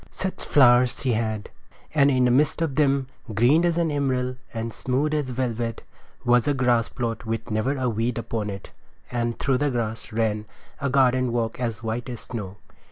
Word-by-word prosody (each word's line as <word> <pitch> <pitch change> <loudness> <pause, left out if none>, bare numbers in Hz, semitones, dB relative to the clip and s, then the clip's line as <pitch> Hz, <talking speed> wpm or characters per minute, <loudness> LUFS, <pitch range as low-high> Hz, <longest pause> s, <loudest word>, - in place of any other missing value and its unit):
Such 190 0 -3
flowers 125 -3 +5
as - - -8
she 130 - +1
had! 110 -2 -2 0.4
And 140 -2 +5
in 130 -2 +3
the 125 - +4
midst 150 +5 +2
of 155 -4 -1
them, 140 -2 +2 0.3
green 130 +10 +4
as 170 -1 +2
an 165 -2 +1
emerald 130 -3 -1
and 115 0 -4
smooth 140 +4 -1
as 150 -4 -1
velvet, 120 -2 -2 0.4
was 120 +1 +4
a 145 - +2
grass 125 -3 +2
plot 115 -2 -4
with 115 +1 -3
never 125 +7 0
a 130 -1 0
weed 115 +1 -1
upon 115 -2 -3
it. 100 -1 -8 0.4
And 120 -1 -1
through 135 -2 +1
the 145 0 +2
grass 115 -3 -3
ran 110 -1 -1 0.3
a 140 -1 -1
garden 130 -2 +3
walk 115 -1 -1
as 115 -2 -3
white 115 +3 -3
as 120 -2 -6
snow. 105 -5 -6
125 Hz, 190 wpm, -24 LUFS, 115-135 Hz, 0.4 s, flowers